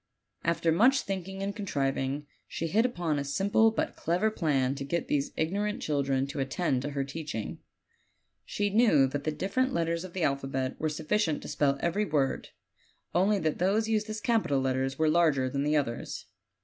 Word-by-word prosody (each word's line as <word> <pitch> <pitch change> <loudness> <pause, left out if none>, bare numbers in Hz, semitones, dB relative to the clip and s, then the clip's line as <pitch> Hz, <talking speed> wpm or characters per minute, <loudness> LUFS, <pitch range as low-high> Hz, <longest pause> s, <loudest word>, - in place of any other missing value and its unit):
After 170 0 +1
much 250 +11 +4
think 190 -2 -4
ing 195 0 -6
and 200 +1 -3
contriving, 140 -7 -1 0.2
she 165 - -4
hit 220 +9 +3
upon 170 -11 -1
a - - -1
simple 200 +10 +3
but 220 - -2
clever 180 +7 +1
plan 140 -9 +1
to 140 0 -5
get 155 +4 -2
these 145 -1 0
ignorant 205 +6 -1
children 135 -3 0
to 140 +1 -6
attend 135 0 0
to 145 - -3
her 140 -1 -2
teaching. 140 -6 -5 0.8
She 205 0 -1
knew 205 - +5
that 140 +2 -3
the 155 - +1
different 255 - -1
letters 170 0 0
of 185 -2 -9
the 185 - -2
alphabet 135 -2 -1
were 155 - 0
sufficient 160 +2 0
to - - -7
spell 140 -1 +1
every 185 +5 +1
word 145 -6 0 0.6
only 195 +4 +3
that 155 -1 -1
those 205 +5 +2
used 215 -1 0
as 215 0 -3
capital 220 - +2
letters 130 0 -1
were 160 - +2
larger 155 -5 +3
than 140 - -1
the 150 +2 +2
others. 120 -5 -3
160 Hz, 185 wpm, -29 LUFS, 140-200 Hz, 0.8 s, knew